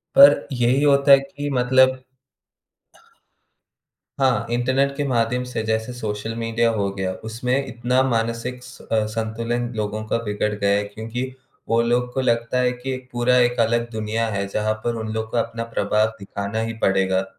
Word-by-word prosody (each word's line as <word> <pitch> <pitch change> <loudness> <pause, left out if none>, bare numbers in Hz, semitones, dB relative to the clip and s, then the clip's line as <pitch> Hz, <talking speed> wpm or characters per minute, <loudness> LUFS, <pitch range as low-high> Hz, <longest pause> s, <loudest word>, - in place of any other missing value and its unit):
पर 280 +1 +10 0.3
यही 125 +4 +3
होता 140 -1 +4
है 135 - +9
कि 145 +1 -6
मतलब 130 +1 +3 2.2
हाँ, 125 -5 +2
इंटरनेट 130 +3 +1
के 145 - -1
माध्यम 125 0 +1
से, - - -2
जैसे 110 +2 -1
सोशल 110 -1 -4
मिडिया 115 0 +1
हो 100 -3 -1
गया 95 -1 -2
उसमें 125 +5 -1
इतना 125 +1 0
मानसिक 115 +1 -2
स 130 +2 -13
अ, 110 -1 +2
संतुलन 115 +2 -2
लोगों 110 0 -3
का - - +1
बिगड़ 105 0 -1
गया 100 0 +2
क्योंकि 110 +4 -5 0.5
वो 115 +1 +3
लोग 125 +1 0
को 130 - 0
लगता 120 0 +1
है 125 0 +2
कि 130 +1 -4 0.2
पूरा 125 +1 +2
एक 120 -1 +2
अलग 115 +1 +1
दुनिया 110 +1 -1
है, 100 -1 -2
जहाँ 110 +2 0
पर 120 -1 -1
उन 110 - -5
लोग 110 0 -3
को 120 - -1
अपना 115 0 -2
प्रभाव 110 -1 +1
दिखाना 100 +2 -4
ही 115 0 -3
पड़ेगा 95 0 +2
115 Hz, 165 wpm, -22 LUFS, 110-125 Hz, 2.2 s, पर